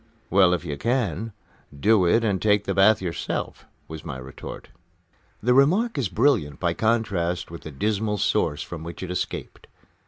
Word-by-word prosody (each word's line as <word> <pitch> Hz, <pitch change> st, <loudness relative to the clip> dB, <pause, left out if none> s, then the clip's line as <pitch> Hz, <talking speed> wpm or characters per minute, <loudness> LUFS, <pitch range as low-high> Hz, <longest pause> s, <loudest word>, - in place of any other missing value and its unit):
"Well, 95 Hz, -2 st, +5 dB
if 90 Hz, -, -7 dB
you 75 Hz, -3 st, -4 dB
can, 115 Hz, -, -1 dB, 0.5 s
do 105 Hz, +1 st, +4 dB
it 115 Hz, +7 st, +3 dB
and 100 Hz, -4 st, 0 dB
take 105 Hz, -1 st, +3 dB
the 100 Hz, -, -2 dB
bath 100 Hz, +2 st, +4 dB
yourself," 85 Hz, -2 st, -4 dB, 0.2 s
was 80 Hz, -1 st, -8 dB
my -, -, -6 dB
retort. 65 Hz, +1 st, -9 dB, 0.7 s
The 125 Hz, +2 st, +4 dB
remark 185 Hz, -, +3 dB
is 125 Hz, -9 st, -1 dB
brilliant 100 Hz, -, +1 dB
by 85 Hz, -2 st, +1 dB
contrast 95 Hz, -6 st, 0 dB
with 85 Hz, -, -8 dB
the -, -, -8 dB
dismal 105 Hz, +7 st, -1 dB
source 75 Hz, -5 st, 0 dB
from 85 Hz, -2 st, -8 dB
which 85 Hz, +2 st, -7 dB
it 90 Hz, -, -5 dB
escaped. 90 Hz, -, -5 dB
100 Hz, 165 wpm, -24 LUFS, 85-110 Hz, 0.7 s, Well